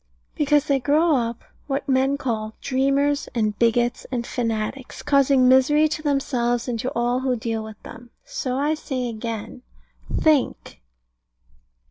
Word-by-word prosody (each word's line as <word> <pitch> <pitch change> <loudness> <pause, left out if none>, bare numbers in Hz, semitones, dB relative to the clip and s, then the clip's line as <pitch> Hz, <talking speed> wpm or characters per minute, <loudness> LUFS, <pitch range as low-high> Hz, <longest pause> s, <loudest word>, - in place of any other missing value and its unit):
Because 295 0 +2
they 280 -2 +2
grow 300 +5 +3
up 235 -2 -2 0.2
what 275 0 -2
men 270 +1 +2
call 220 -5 -3
dreamers, 275 +2 +1
and 215 -3 0
bigots, 240 +1 +1
and 240 -2 -2
fanatics, 230 +2 -3
causing 275 -2 +4
misery 275 +4 +5
to 310 0 -3
themselves 250 -5 0
and 235 -2 -2
to 250 - -2
all 240 +1 +1
who 260 -1 0
deal 225 -1 -3
with 220 -1 -10
them. 240 +1 -11 0.2
So - - -3
I 295 +3 +1
say 260 -5 -3
again, 230 +1 -6 0.5
think. 305 -5 +1
260 Hz, 140 wpm, -23 LUFS, 235-280 Hz, 0.5 s, misery